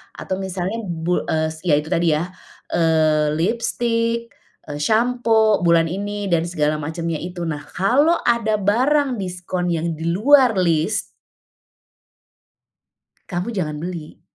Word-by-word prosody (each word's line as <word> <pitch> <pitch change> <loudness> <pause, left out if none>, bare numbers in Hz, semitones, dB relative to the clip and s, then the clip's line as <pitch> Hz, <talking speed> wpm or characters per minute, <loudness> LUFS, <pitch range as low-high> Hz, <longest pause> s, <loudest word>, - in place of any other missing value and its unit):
atau 185 - -4
misalnya 190 +2 -3
bu 170 0 -1
eee, 160 0 0 0.2
ya 150 - +5
itu 150 - -7
tadi 170 -2 +2
ya, 175 +4 -3 0.4
eee, 155 -2 +2
lipstik, 230 +4 0 0.4
eee, 145 - -4
sampo 225 -1 +2
bulan 170 -1 +4
ini 205 +3 -4
dan 165 -1 +3
segala 155 -3 0
macamnya 165 +2 -3
itu 175 0 -6
nah 150 -2 -4
kalau 260 - +2
ada 230 -2 +2
barang 255 +7 +2
diskon 180 -1 -3
yang 165 0 -1
di 165 +1 -2
luar 255 +4 +5
list 170 +4 +1 2.2
Kamu 180 +4 -4
jangan 150 -5 -3
beli. 170 -3 -7
180 Hz, 125 wpm, -21 LUFS, 165-225 Hz, 2.2 s, ya